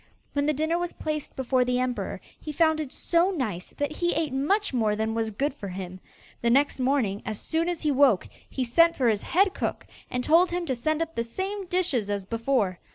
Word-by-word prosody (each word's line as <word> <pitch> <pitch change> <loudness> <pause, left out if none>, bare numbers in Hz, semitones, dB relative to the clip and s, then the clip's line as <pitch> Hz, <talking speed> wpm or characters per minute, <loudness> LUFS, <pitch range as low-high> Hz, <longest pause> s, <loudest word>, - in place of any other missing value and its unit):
When 285 0 +1
the 305 - +3
dinner 315 +4 0
was 350 0 -3
placed 305 -1 -4
before 260 -1 +2
the 250 0 0
emperor 255 -1 -2 0.2
he 305 - -6
found 315 +1 +3
it 295 -4 -4
so 345 +2 +2
nice 220 - -3
that 290 +1 -2
he 345 0 +1
ate 310 -4 -1
much 345 +8 +1
more 220 -4 +2
than 220 +1 -1
was 225 -1 -1
good 275 +8 -1
for 220 -8 -7
him. 185 0 -6 0.4
The 235 - +2
next 275 +3 +3
morning, 250 -7 +1
as 215 -2 -4
soon 330 +2 0
as 345 -2 -3
he 300 - +2
woke, 265 -8 +4 0.2
he 265 - -2
sent 335 +8 +4
for 250 -3 +2
his 210 -2 +1
head 385 +2 +2
cook, - - -3 0.2
and 250 0 -2
told 335 +6 +5
him 350 0 -2
to 265 -5 -1
send 310 +6 0
up 330 0 -9
the 230 - -1
same 380 - -4
dishes 340 - 0
as 200 -2 -2
before. 230 -4 0
275 Hz, 220 wpm, -26 LUFS, 230-330 Hz, 0.4 s, told